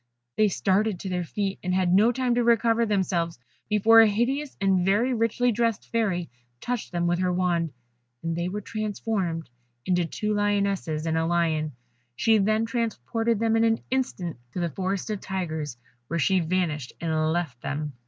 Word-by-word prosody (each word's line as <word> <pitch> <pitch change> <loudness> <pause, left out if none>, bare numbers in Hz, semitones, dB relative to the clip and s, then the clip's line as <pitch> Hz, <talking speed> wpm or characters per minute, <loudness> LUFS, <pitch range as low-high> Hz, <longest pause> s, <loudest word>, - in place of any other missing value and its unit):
They 215 - +4
started 200 0 +1
to 190 - -4
their 180 -1 -1
feet, 195 +3 -3
and 180 0 -1
had 185 -1 +2
not 220 +5 +4
time 255 -2 +1
to 240 0 +2
recover 230 0 +3
themselves 180 -5 0 0.3
before 220 +2 +7
a 225 - +6
hideous 260 +7 -1
and 190 -2 +2
very 210 +7 +2
richly 235 +1 +1
dressed 230 -1 -1
Fairy 195 -7 0 0.3
touched 245 - -3
them 175 -1 -1
with 175 0 +1
her 185 -1 +1
wand, 175 -3 0 0.5
and 165 0 -1
they 170 +1 -2
were 205 +3 -4
transformed 205 -6 -3 0.4
into 180 -2 +2
two 210 +5 -2
Lionesses 200 -6 0
and 160 0 +1
a 165 - 0
Lion, 160 -3 0 0.4
she 225 - +3
then 215 +3 +2
transported 230 - -1
them 225 +1 +1
in 225 - +3
an 225 0 +2
instant 190 - -2 0.2
to - - -3
the 170 -2 -1
Forest 190 +5 -2
of 210 - -3
Tigers, 160 -8 -4 0.3
where 170 - -2
she 185 +4 +3
vanished 160 -6 -1
and 160 -1 0
left 160 -8 -2
them. 145 0 -3
190 Hz, 175 wpm, -26 LUFS, 170-225 Hz, 0.5 s, before